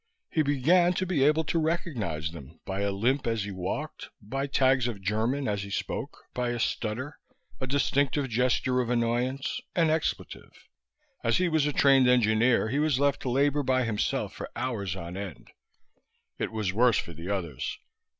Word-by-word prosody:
He 160 Hz, -, +2 dB
began 160 Hz, +5 st, +3 dB
to 185 Hz, -, -1 dB
be 170 Hz, -7 st, +1 dB
able 155 Hz, +3 st, +4 dB
to 165 Hz, +2 st, 0 dB
recognize 135 Hz, -, -2 dB
them 80 Hz, -1 st, -12 dB
by 95 Hz, +1 st, -3 dB
a 100 Hz, -, +1 dB
limp 120 Hz, +7 st, 0 dB
as 115 Hz, -3 st, 0 dB
he 100 Hz, -, -5 dB
walked, 95 Hz, +11 st, -4 dB
by 135 Hz, +6 st, -3 dB
tags 130 Hz, -2 st, +3 dB
of 115 Hz, -5 st, -4 dB
German 110 Hz, +8 st, 0 dB
as 100 Hz, -1 st, -1 dB
he 100 Hz, -, -6 dB
spoke, -, -, -4 dB
by 125 Hz, -1 st, -1 dB
a 120 Hz, 0 st, -2 dB
stutter, 120 Hz, +6 st, -2 dB, 0.4 s
a 130 Hz, -, -3 dB
distinctive 140 Hz, +1 st, +1 dB
gesture 125 Hz, +1 st, +1 dB
of 120 Hz, -, -3 dB
annoyance, 125 Hz, +3 st, 0 dB
an 165 Hz, -3 st, +3 dB
expletive. 160 Hz, 0 st, -2 dB, 0.7 s
As -, -, +3 dB
he 180 Hz, -1 st, +2 dB
was 160 Hz, -3 st, +2 dB
a -, -, +1 dB
trained 135 Hz, -2 st, +5 dB
engineer 115 Hz, -1 st, +3 dB
he 140 Hz, +5 st, 0 dB
was 150 Hz, -3 st, +2 dB
left 140 Hz, -1 st, +2 dB
to 130 Hz, -, -2 dB
labor 140 Hz, +3 st, +2 dB
by 130 Hz, -1 st, +2 dB
himself 110 Hz, -3 st, -1 dB
for -, -, -7 dB
hours 110 Hz, -7 st, -2 dB
on 85 Hz, -1 st, -7 dB
end. 100 Hz, -1 st, -7 dB, 0.9 s
It -, -, -2 dB
was 105 Hz, -4 st, -2 dB
worse 120 Hz, +1 st, +4 dB
for 85 Hz, -, -4 dB
the 85 Hz, +4 st, -7 dB
others. 85 Hz, -10 st, -3 dB
125 Hz, 180 wpm, -28 LUFS, 105-140 Hz, 0.9 s, trained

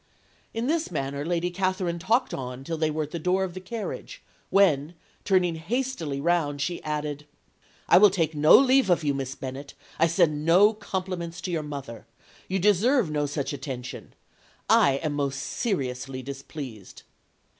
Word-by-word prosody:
"In 225 Hz, +1 st, -3 dB
this 320 Hz, +3 st, 0 dB
manner 140 Hz, -3 st, -3 dB
Lady 175 Hz, +2 st, -1 dB
Catherine 185 Hz, -2 st, -1 dB
talked 230 Hz, +8 st, +1 dB
on 125 Hz, 0 st, -5 dB
till 165 Hz, +4 st, -3 dB
they 155 Hz, -1 st, 0 dB
were 155 Hz, 0 st, -1 dB
at 150 Hz, -, -8 dB
the 170 Hz, -, -4 dB
door 180 Hz, +4 st, +1 dB
of 185 Hz, -2 st, -4 dB
the 185 Hz, -, -6 dB
carriage, 215 Hz, +4 st, -6 dB, 0.3 s
when, 170 Hz, -5 st, +3 dB, 0.3 s
turning 185 Hz, -3 st, +2 dB
hastily 170 Hz, -, -2 dB
round, 150 Hz, -2 st, +1 dB
she 175 Hz, +5 st, -2 dB
added 150 Hz, -1 st, -4 dB, 0.6 s
"'I 200 Hz, +4 st, +7 dB
take 165 Hz, -5 st, 0 dB
no 150 Hz, +1 st, +6 dB
leave 265 Hz, -4 st, +4 dB
of 175 Hz, -2 st, +3 dB
you, 145 Hz, -1 st, +1 dB
Miss 135 Hz, -1 st, -4 dB
Bennet. 135 Hz, +2 st, -7 dB, 0.2 s
I 165 Hz, -, +5 dB
send 160 Hz, -3 st, +2 dB
no 185 Hz, +7 st, +5 dB
compliments 185 Hz, -4 st, -4 dB
to 180 Hz, -, -4 dB
your 165 Hz, -2 st, -1 dB
mother. 140 Hz, -5 st, -8 dB, 0.4 s
You 190 Hz, -, -1 dB
deserve 210 Hz, -, +3 dB
no 145 Hz, -1 st, 0 dB
such 145 Hz, 0 st, -3 dB
attention. 130 Hz, -3 st, -7 dB, 0.5 s
I 140 Hz, -, +5 dB
am 155 Hz, -2 st, -1 dB
most 140 Hz, -2 st, -1 dB
seriously 135 Hz, -, -3 dB
displeased.' 135 Hz, -, -8 dB
165 Hz, 160 wpm, -26 LUFS, 140-185 Hz, 0.6 s, I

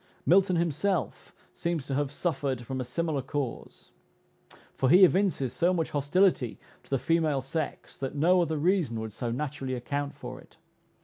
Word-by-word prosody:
Milton 185 Hz, 0 st, +4 dB
himself 170 Hz, -, -1 dB, 0.2 s
seems 170 Hz, -5 st, -2 dB
to 140 Hz, -, -4 dB
have 140 Hz, 0 st, 0 dB
suffered 140 Hz, -5 st, -2 dB
from 130 Hz, +2 st, -3 dB
a -, -, -1 dB
similar 145 Hz, +3 st, -2 dB
cause, 135 Hz, -2 st, -5 dB, 0.8 s
for 130 Hz, -, +1 dB
he 180 Hz, +6 st, +8 dB
evinces 180 Hz, -, +3 dB
so 180 Hz, +2 st, +2 dB
much 165 Hz, -2 st, -1 dB
hostility 145 Hz, -, +2 dB, 0.2 s
to -, -, -25 dB
the 135 Hz, -, +2 dB
female 155 Hz, +1 st, +1 dB
sex, 155 Hz, +3 st, -4 dB
that 135 Hz, +1 st, -4 dB
no 175 Hz, +5 st, +4 dB
other 160 Hz, -2 st, 0 dB
reason 160 Hz, -, +1 dB
would 110 Hz, -1 st, -5 dB
so 120 Hz, +2 st, -3 dB
naturally 130 Hz, +1 st, -3 dB
account 140 Hz, +3 st, -3 dB
for -, -, -8 dB
it. -, -, -22 dB
145 Hz, 165 wpm, -28 LUFS, 130-170 Hz, 0.8 s, he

